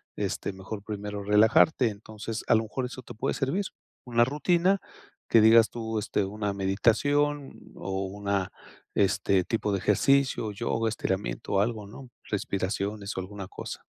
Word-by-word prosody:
este, - - -2
mejor 100 +2 -7
primero 105 -1 -5
relajarte. 110 +6 +5
Entonces 110 +2 -6
a - - +5
lo 110 - +2
mejor 125 +4 -3
eso 130 +1 -7
te - - -10
puede 130 +5 -1
servir, 155 +9 -1 0.4
una 120 -1 +3
rutina 175 +8 +2 0.5
que 115 - +6
digas 110 +1 +7
tú, 110 -2 -3
este 105 0 0
una 105 +1 -3
meditación, 135 +9 0
o 95 0 -3
una 100 -1 -2 0.4
este 95 -1 +2
tipo 105 0 -1
de 100 - 0
ejercicio, 125 +2 +2
yoga, 115 +2 -1
estiramiento 100 -3 -3
o 100 - +4
algo, 105 -2 -2
¿no? 130 +5 -11 0.2
Respiraciones 100 +1 -2
o 95 - 0
alguna 100 0 -7
cosa. - - -8
105 Hz, 150 wpm, -28 LUFS, 100-120 Hz, 0.5 s, digas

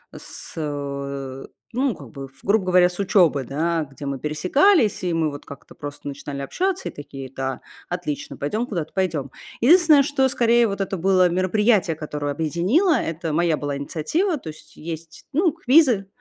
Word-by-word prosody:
с, - - -11
э, 140 -3 -5 0.3
ну 255 -2 0
как 140 -6 -12
бы, 135 -1 -8
в 135 +1 -24
грубо 200 0 +2
говоря, 180 -1 +5
с 180 - -10
учебы, 175 -8 +3
да, 160 +4 -1
где 140 +1 -9
мы 140 -1 -3
пересекались, 210 - +2
и 175 - 0
мы 165 -2 +1
вот 145 - -9
как-то 140 - -12
просто 145 0 -9
начинали 140 0 -6
общаться 370 - -2
и - - -9
такие: 135 -2 -9
"Да, 135 -1 -3 0.3
отлично, 175 -5 -4
пойдем 215 +12 -2
куда-то, 170 -9 -4
пойдем". 160 -8 -1 0.3
Единственное, 310 +1 +6
что 270 -1 +2
скорее 235 -2 +3
вот 200 -1 -3
это 195 0 -2
было 185 0 +3
мероприятие, 185 0 +2
которое 150 -2 -4
объединило, 175 - +2
это 165 - -2
моя 170 +1 +2
была 145 -1 -3
инициатива. 305 - -1
То 170 - -8
есть 155 - -13
есть, 165 0 -8
ну, 325 +2 +2
квизы, 260 -9 +4
170 Hz, 170 wpm, -22 LUFS, 145-220 Hz, 0.3 s, Единственное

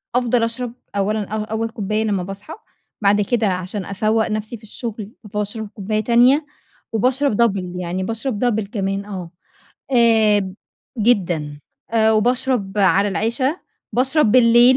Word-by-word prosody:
أفضل 245 -1 +2
أشرب 230 +1 -2 0.2
أولًا 205 +1 0
أو 215 +1 -3
أول 220 +1 -2
كوباية 215 0 -2
لما 200 -4 0
باصحى، 195 - -8 0.5
بعد 205 0 +4
كده 220 +2 +1
عشان 185 +1 -3
أفوَّق 215 +3 0
نَفسي 215 +1 -4
في 220 - -25
الشغل 220 -1 -6 0.2
باشرب 210 +1 -3
كوباية 215 +1 -2
تانية 250 +6 +4 0.5
وباشرب 250 +1 +1
double 185 -5 0
يعني 180 +2 -3
باشرب 225 +2 -2
double 220 -4 0
كمان 195 -1 -2
آه 185 -5 -7 0.6
آآ 215 -5 +4 0.4
جدًا، 175 -10 +1 0.3
آآ 220 -1 +3
وباشرب 230 -2 0
على 200 +1 +4
العِشا 235 - 0 0.4
بشرب 260 -1 +2
بالليل 240 +1 +6
215 Hz, 135 wpm, -20 LUFS, 200-235 Hz, 0.6 s, بالليل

